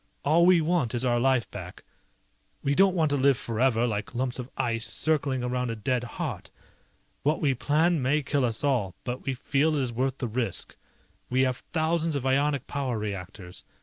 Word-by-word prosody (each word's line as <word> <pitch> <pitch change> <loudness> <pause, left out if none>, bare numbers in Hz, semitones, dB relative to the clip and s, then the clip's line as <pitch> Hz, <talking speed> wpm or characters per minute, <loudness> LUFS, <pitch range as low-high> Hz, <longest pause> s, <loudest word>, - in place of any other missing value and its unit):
All 165 +4 +5
we 180 -2 +6
want 155 -7 0
is 120 +2 -1
our 120 -1 +2
life 130 -1 +2
back. - - -9 0.8
We 140 - +1
don't 190 +4 +4
want 160 -4 +2
to 145 - +2
live 135 -1 +4
forever 120 0 +1
like 105 0 -3
lumps 125 +1 -1
of 125 0 -6
ice 115 -1 +1
circling 140 -5 +1
around 125 0 -1
a 115 - -2
dead 120 +3 -1
heart. 120 - -5 0.7
What 150 +2 +1
we 140 -3 +2
plan 155 +5 +2
may 145 +4 +1
kill 140 0 0
us 115 0 -1
all, 120 -10 +1
but 125 +1 -4
we 135 - -1
feel 145 +5 +1
it 145 - +1
is 120 -2 -2
worth 130 +3 -1
the 125 - -2
risk. 115 -4 -2 0.5
We 130 +1 +2
have 130 -1 +1
thousands 165 -1 +1
of 135 -2 -2
ionic 140 0 +1
power 135 -5 -2
reactors. 95 -3 -6
130 Hz, 190 wpm, -27 LUFS, 120-145 Hz, 0.8 s, we